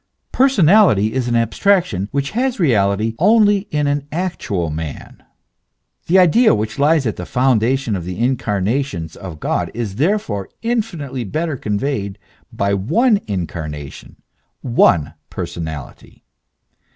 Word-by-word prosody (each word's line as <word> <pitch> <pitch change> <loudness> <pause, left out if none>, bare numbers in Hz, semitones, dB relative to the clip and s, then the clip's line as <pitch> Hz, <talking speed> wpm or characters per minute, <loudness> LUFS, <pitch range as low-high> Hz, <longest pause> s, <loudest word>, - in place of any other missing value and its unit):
Personality 195 - +4
is 130 -2 -1
an 120 - 0
ab 115 -1 +1
straction, 175 - +1
which 140 0 -2
has 250 +2 -1
reality 110 - +2
only 205 +1 +4
in 150 -1 0
an 145 0 -1
actual 150 - -2
man.* 75 -2 -7 0.9
The 180 - +4
idea 190 +7 +5
which 110 +4 -4
lies 150 0 +3
at 110 - -2
the - - -5
foundation 125 -1 +1
of 90 - -4
the 90 +1 -6
incarnations 110 - -1
of 90 -6 -9
God - - -1
is 110 -4 -4
therefore 145 - -1
infinitely 175 - -2
better 155 - -2
conveyed 105 -3 -3 0.3
by 100 0 -1
one 200 - +2
incarnation, 80 -6 -6 0.5
one 85 - +3 0.2
personality. 80 -5 -7
125 Hz, 125 wpm, -18 LUFS, -, 0.9 s, idea